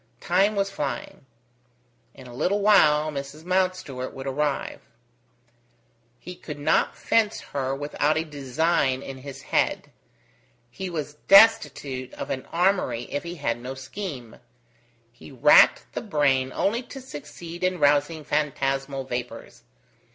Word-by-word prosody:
Time 195 +4 +2
was 195 0 0
flying. 140 -5 -5 0.9
In 130 - -13
a 125 - -11
little 190 +11 0
while 155 -7 +4
Mrs. 140 +2 -7
Mountstuart 185 -8 -1
would 135 - -7
arrive. 140 +1 -2 1.4
He 180 - -9
could 150 -4 -8
not 145 - +1
fence 220 -2 +1
her 135 -1 -3
without 145 +2 0
a 160 - -1
design 140 -1 0
in 135 -1 -8
his 135 0 -10
head; - - 0 0.8
he 190 +8 -5
was 150 -3 -5
destitute 145 - +4
of - - -6
an 130 - -4
armoury 175 -9 +1
if 145 - -2
he 170 +1 -7
had 120 -7 -2
no 130 +2 -6
scheme: 130 - -7 0.7
he 120 - -14
racked 135 +3 +6
the - - -3
brain 140 - +1
only 225 - 0
to 255 +2 -10
succeed 170 - -9
in 185 0 +1
rousing 145 +1 +2
phantasmal 135 -2 -1
vapours. 125 -1 -6
145 Hz, 130 wpm, -25 LUFS, 135-180 Hz, 1.4 s, racked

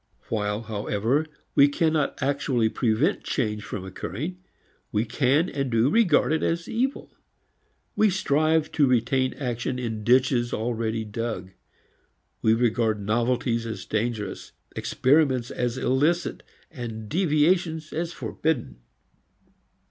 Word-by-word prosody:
While 105 0 -1
however 110 +7 -1 0.3
we 140 - +7
cannot 155 0 0
actually 135 -4 +1
prevent 115 +4 +1
change 105 -5 -2
from 100 -2 -6
occurring 125 - -5 0.5
we 105 +2 +1
can 135 +7 +2
and 140 -5 -2
do 115 +4 +2
regard 180 -9 +4
it 160 - 0
as 170 0 -1
evil. 260 +4 -2 0.8
We 215 - +4
strive 155 -3 +1
to 145 -3 +3
retain 130 +1 +1
action 125 -1 -3
in 110 -4 -4
ditches 125 0 +3
already 110 -1 -2
dug. 105 -4 -4 0.9
We 110 0 +4
regard 115 -2 +1
novelties 115 +2 0
as 110 - -6
dangerous, 110 -3 -3 0.2
experiments 130 -3 +2
as 125 0 -2
illicit 150 +8 +1 0.3
and 115 -6 -6
deviations 160 - +1
as 165 +1 -2
forbidden. 140 - -2
125 Hz, 115 wpm, -25 LUFS, 110-150 Hz, 0.9 s, we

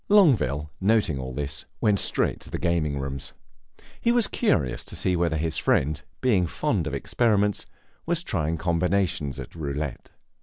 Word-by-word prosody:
Longueville, 105 - +4
noting 100 -8 +2
all 65 0 -5
this, 70 +2 -3
went 105 -2 +3
straight - - +3
into - - -11
the - - -3
gaming 85 -4 0
rooms; 70 0 -5 0.7
he 235 - +3
was 240 -2 +4
curious 75 - 0
to - - -8
see 90 - +1
whether 85 -2 +1
his 80 0 -1
friend, 75 +2 +1 0.2
being 105 -9 +3
fond 100 - -1
of 70 - -2
experiments, 105 - +1 0.4
was 170 0 +1
trying 80 - -1
combinations 85 -4 0
at - - -8
roulette. 75 -3 -4
85 Hz, 155 wpm, -25 LUFS, 75-105 Hz, 0.7 s, Longueville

